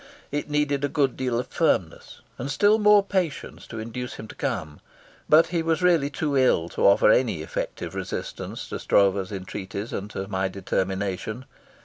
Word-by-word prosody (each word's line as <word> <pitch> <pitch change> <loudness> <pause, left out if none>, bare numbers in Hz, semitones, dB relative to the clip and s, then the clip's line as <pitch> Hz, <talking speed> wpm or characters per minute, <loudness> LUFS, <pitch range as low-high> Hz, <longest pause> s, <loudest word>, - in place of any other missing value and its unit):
It 145 +1 -3
needed 145 -1 0
a - - +3
good 140 -3 +1
deal 125 -2 -1
of 125 - -1
firmness - - -1 0.2
and 135 - -4
still 205 +9 +4
more 210 -1 +6
patience 185 -6 -3
to 115 - -8
induce 115 +3 -5
him 110 - -8
to - - -8
come, 75 -1 -4 0.5
but 155 +2 +6
he 170 -1 0
was 165 +2 0
really 170 -6 +4
too 145 -1 -2
ill 125 -11 +3
to - - +2
offer 100 +1 +6
any 110 -12 +2
effective - - -5
resistance - - -5
to - - -4
Stroeve's 100 -1 +2
entreaties 100 +2 -6
and 100 +1 -4
to 95 -1 -5
my 95 -1 -1
determination. 95 +4 -3
125 Hz, 170 wpm, -25 LUFS, 100-150 Hz, 0.5 s, more